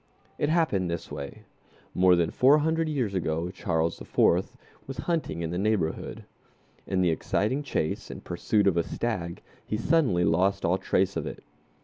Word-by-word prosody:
It 150 Hz, -, +1 dB
happened 155 Hz, -, +1 dB
this 85 Hz, -1 st, -4 dB
way: 70 Hz, -, -7 dB, 0.5 s
More 90 Hz, 0 st, +5 dB
than 85 Hz, -2 st, +1 dB
four 135 Hz, +4 st, +5 dB
hundred 160 Hz, +1 st, +1 dB
years 125 Hz, -9 st, -1 dB
ago 85 Hz, -1 st, -1 dB
Charles 80 Hz, -3 st, -1 dB
IV. -, -, +2 dB, 0.3 s
was 135 Hz, -2 st, -6 dB
hunting 155 Hz, -, -1 dB
in 80 Hz, -, -3 dB
the 90 Hz, -, -2 dB
neighborhood. 100 Hz, -6 st, -1 dB, 0.6 s
In 95 Hz, -1 st, +1 dB
the 90 Hz, -2 st, +3 dB
exciting 105 Hz, -, 0 dB
chase 125 Hz, -, -2 dB
and -, -, -8 dB
pursuit 105 Hz, -2 st, 0 dB
of 95 Hz, -3 st, +3 dB
a 85 Hz, -, +3 dB
stag 90 Hz, -8 st, -3 dB, 0.2 s
he 105 Hz, -, -3 dB
suddenly 120 Hz, -, +2 dB
lost 95 Hz, +4 st, +2 dB
all 90 Hz, +3 st, +2 dB
trace 95 Hz, +1 st, +1 dB
of -, -, -2 dB
it. -, -, -8 dB
95 Hz, 165 wpm, -27 LUFS, 85-130 Hz, 0.6 s, More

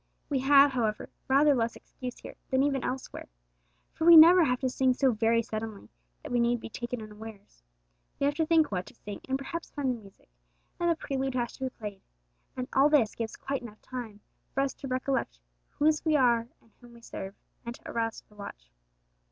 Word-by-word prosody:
We 280 Hz, -3 st, +1 dB
have, 280 Hz, +1 st, +6 dB
however, 225 Hz, -5 st, -2 dB, 0.2 s
rather 285 Hz, +2 st, +5 dB
less 230 Hz, -3 st, 0 dB
excuse 250 Hz, -1 st, -8 dB
here -, -, -10 dB, 0.2 s
than 260 Hz, +1 st, +2 dB
even 275 Hz, -3 st, 0 dB
elsewhere. 260 Hz, +1 st, -5 dB, 0.7 s
For -, -, -5 dB
we 340 Hz, -1 st, +11 dB
never 340 Hz, +3 st, +9 dB
have 250 Hz, -4 st, +1 dB
to 260 Hz, -, +1 dB
sing 255 Hz, 0 st, +2 dB
so 265 Hz, 0 st, +3 dB
very 230 Hz, +1 st, +2 dB
suddenly 220 Hz, -1 st, -6 dB, 0.3 s
that -, -, -8 dB
we 245 Hz, -, +2 dB
need 235 Hz, 0 st, +2 dB
be -, -, -8 dB
taken 240 Hz, 0 st, -5 dB
unawares. 210 Hz, -, -12 dB, 0.6 s
We 280 Hz, -, +1 dB
have 285 Hz, -, +2 dB
to 320 Hz, -, +2 dB
think 320 Hz, -5 st, +3 dB
what 180 Hz, -2 st, -3 dB
to -, -, -14 dB
sing, 205 Hz, -1 st, -8 dB
and 265 Hz, -, +1 dB
perhaps 330 Hz, +5 st, -6 dB
find 280 Hz, -3 st, -1 dB
the 235 Hz, -2 st, -5 dB
music, 195 Hz, -2 st, -18 dB, 0.5 s
and 345 Hz, 0 st, +1 dB
the 335 Hz, -, +3 dB
prelude 270 Hz, -4 st, -3 dB
has 240 Hz, -1 st, -1 dB
to 265 Hz, -, -3 dB
be -, -, -1 dB
played, 210 Hz, -5 st, -8 dB, 0.6 s
and 255 Hz, 0 st, -3 dB
all 275 Hz, +2 st, +5 dB
this 275 Hz, -8 st, +3 dB
gives 225 Hz, -1 st, -5 dB
quite 275 Hz, 0 st, -4 dB
enough 215 Hz, -3 st, -12 dB
time 230 Hz, -5 st, -7 dB, 0.3 s
for 275 Hz, -, +2 dB
us 275 Hz, -1 st, -1 dB
to 275 Hz, -, -8 dB
recollect 255 Hz, -, -2 dB, 0.3 s
whose 305 Hz, +1 st, +1 dB
we 315 Hz, -2 st, +2 dB
are 240 Hz, -4 st, +3 dB
and 230 Hz, -, -28 dB
whom 240 Hz, -1 st, -15 dB
we 235 Hz, -, -15 dB
serve, 195 Hz, -3 st, -7 dB, 0.3 s
and 235 Hz, 0 st, -6 dB
to -, -, -14 dB
arouse 225 Hz, -1 st, -2 dB
to -, -, -43 dB
the -, -, -21 dB
watch. -, -, -10 dB
250 Hz, 210 wpm, -29 LUFS, 225-275 Hz, 0.7 s, we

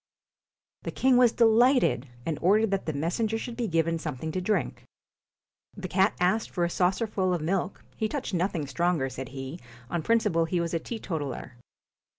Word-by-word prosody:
The -, -, -5 dB
king 260 Hz, -1 st, +3 dB
was 245 Hz, -2 st, +6 dB
delighted, 230 Hz, -, +4 dB, 0.2 s
and 155 Hz, -3 st, -2 dB
ordered 210 Hz, +4 st, +3 dB
that 195 Hz, -3 st, -1 dB
the 155 Hz, -, -1 dB
messenger 175 Hz, +10 st, -1 dB
should 230 Hz, +1 st, -6 dB
be 235 Hz, -1 st, -2 dB
given 165 Hz, -1 st, +1 dB
something 160 Hz, 0 st, -4 dB
to 185 Hz, -, -2 dB
drink. 210 Hz, +4 st, -1 dB, 0.9 s
The 190 Hz, -1 st, -5 dB
cat 190 Hz, +2 st, +2 dB
asked 185 Hz, +5 st, +1 dB
for 175 Hz, -, -1 dB
a 170 Hz, -, 0 dB
saucerful 185 Hz, 0 st, +1 dB
of -, -, -2 dB
milk 180 Hz, +3 st, -2 dB
he 220 Hz, -1 st, -1 dB
touched 275 Hz, -5 st, -4 dB
nothing 175 Hz, -3 st, 0 dB
stronger, 160 Hz, -1 st, 0 dB
said 130 Hz, 0 st, -7 dB
he; 135 Hz, +4 st, -7 dB, 0.3 s
on 170 Hz, -, 0 dB
principle 210 Hz, -4 st, +2 dB
he 175 Hz, +2 st, -1 dB
was 170 Hz, 0 st, -2 dB
a 165 Hz, -, +1 dB
teetotaller. 160 Hz, -, -5 dB
180 Hz, 170 wpm, -27 LUFS, 160-220 Hz, 0.9 s, was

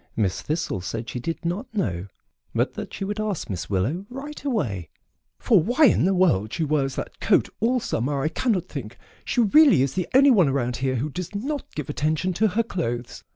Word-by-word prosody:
Miss 100 Hz, -5 st, 0 dB
Thistle 150 Hz, -, -2 dB
said 115 Hz, +6 st, -5 dB
she 125 Hz, -, -4 dB
did 165 Hz, +6 st, -4 dB
not 180 Hz, +9 st, -3 dB
know, 95 Hz, -, -1 dB, 0.5 s
but -, -, +1 dB
that -, -, -6 dB
she 195 Hz, -, -4 dB
would 205 Hz, +2 st, -3 dB
ask 210 Hz, -, -2 dB
Miss 85 Hz, -3 st, -4 dB
Willow 125 Hz, -, -1 dB
right 280 Hz, +4 st, -8 dB
away, 115 Hz, -, -2 dB, 0.5 s
"for 210 Hz, -8 st, +4 dB
why 245 Hz, -, +4 dB
in 225 Hz, -, +4 dB
the 190 Hz, +1 st, +2 dB
world 145 Hz, -, +2 dB
she 165 Hz, -, -1 dB
wears 140 Hz, -3 st, 0 dB
that -, -, -5 dB
fur -, -, -5 dB
coat -, -, -4 dB
all 245 Hz, +4 st, +2 dB
summer 135 Hz, -, -1 dB
I 155 Hz, -, +1 dB
cannot 190 Hz, +1 st, 0 dB
think. 130 Hz, -8 st, -7 dB, 0.3 s
She 245 Hz, -, +1 dB
really 240 Hz, -, +6 dB
is 135 Hz, -1 st, -1 dB
the 180 Hz, -2 st, -2 dB
only 275 Hz, +1 st, +7 dB
one 185 Hz, -, +5 dB
around 125 Hz, -3 st, -1 dB
here 130 Hz, 0 st, 0 dB
who 140 Hz, +5 st, -2 dB
does 180 Hz, +6 st, -6 dB
not 275 Hz, +7 st, -4 dB
give 150 Hz, -, -4 dB
attention 155 Hz, +5 st, 0 dB
to 220 Hz, +5 st, +2 dB
her 215 Hz, +4 st, +1 dB
clothes. 120 Hz, -, -4 dB
165 Hz, 210 wpm, -24 LUFS, -, 0.5 s, only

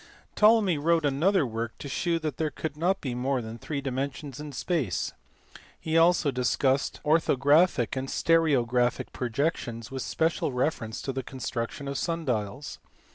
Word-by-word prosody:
Ptolemy 210 Hz, -7 st, +4 dB
wrote 165 Hz, +1 st, +2 dB
another 155 Hz, +5 st, +2 dB
work 115 Hz, -1 st, -4 dB
to -, -, -7 dB
shew 170 Hz, +4 st, 0 dB
that 155 Hz, -4 st, -4 dB
there 160 Hz, -1 st, 0 dB
could 155 Hz, 0 st, -5 dB
not 180 Hz, +5 st, 0 dB
be 130 Hz, -4 st, -3 dB
more 130 Hz, +2 st, 0 dB
than 115 Hz, 0 st, -7 dB
three 145 Hz, +2 st, -4 dB
dimensions 135 Hz, +1 st, -4 dB
in 150 Hz, -1 st, -6 dB
space: 135 Hz, -, -1 dB, 0.7 s
he 160 Hz, 0 st, -2 dB
also 165 Hz, -2 st, +4 dB
discussed 130 Hz, +2 st, +1 dB
orthographic 150 Hz, -2 st, +3 dB
and 130 Hz, 0 st, -3 dB
stereographic 125 Hz, -8 st, +2 dB
projections 120 Hz, -2 st, -2 dB
with 135 Hz, -1 st, -4 dB
special 160 Hz, 0 st, 0 dB
reference 125 Hz, -3 st, -2 dB
to 135 Hz, -, -3 dB
the 130 Hz, -, -2 dB
construction 130 Hz, +1 st, -5 dB
of 140 Hz, -1 st, -2 dB
sun 165 Hz, -1 st, -2 dB
dials. 125 Hz, +2 st, -3 dB
140 Hz, 150 wpm, -27 LUFS, 125-160 Hz, 0.7 s, Ptolemy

